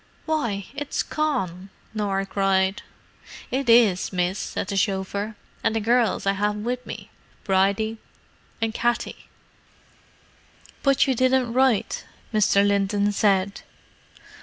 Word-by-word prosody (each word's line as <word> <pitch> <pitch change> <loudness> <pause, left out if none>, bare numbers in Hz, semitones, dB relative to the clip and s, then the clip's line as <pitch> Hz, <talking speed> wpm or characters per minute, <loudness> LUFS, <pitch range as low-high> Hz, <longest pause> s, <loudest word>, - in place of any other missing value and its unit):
"Why, 235 - -1
it's 290 0 -2
Con!" 200 - -2 0.2
Norah 200 -2 -1
cried. 195 0 +1 0.7
"It 265 -1 -1
is, 225 -6 +5
miss," 180 +1 0
said - - -3
the 200 - -4
chauffeur. 200 +2 -1 0.3
"And 225 - +1
the - - +2
gerrls 235 0 +2
I 195 - +4
have 210 +1 0
with 245 +4 -3
me—Bridie 200 +3 -2 0.6
and 225 -1 -1
Katty." 240 +1 -2 1.5
"But 275 -1 +4
you 270 - +2
didn't 255 -1 +2
write," 255 -4 +2 0.3
Mr. 205 -1 +4
Linton 200 0 +1
said. 200 -1 +1
210 Hz, 110 wpm, -24 LUFS, 195-240 Hz, 1.5 s, is